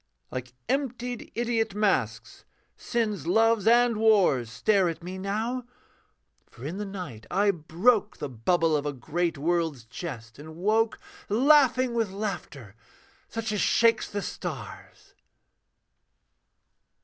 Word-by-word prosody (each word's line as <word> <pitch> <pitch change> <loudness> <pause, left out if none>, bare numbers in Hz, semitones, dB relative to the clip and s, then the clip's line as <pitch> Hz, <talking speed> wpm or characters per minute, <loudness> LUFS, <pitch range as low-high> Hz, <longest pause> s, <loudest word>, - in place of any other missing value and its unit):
Like 125 -1 -6
emptied 250 -3 -2
idiot 225 -3 0
masks, 120 - -1 0.3
sin's 210 - -2
loves 225 +3 +3
and 240 -1 +5
wars 195 - +3
Stare 190 - +2
at 165 0 -6
me 185 +2 -6
now: 220 +6 -2 0.9
for 120 - -12
in 165 +6 -4
the 205 0 -4
night 180 - -7
I 200 +1 +3
broke 185 +7 +1
The 145 - -4
bubble 160 +7 +1
of 145 0 -1
a 145 - -2
great 165 +5 -2
world's 160 -4 -1
jest, 115 -3 -8
and 155 +2 -10
woke 215 +5 +1 0.3
Laughing 255 +1 +4
with 225 -3 0
laughter 185 - -5 0.5
such 225 0 -4
as 210 - 0
shakes 230 -1 +3
the 205 -1 -3
stars. - - -7
195 Hz, 125 wpm, -27 LUFS, 150-225 Hz, 0.9 s, and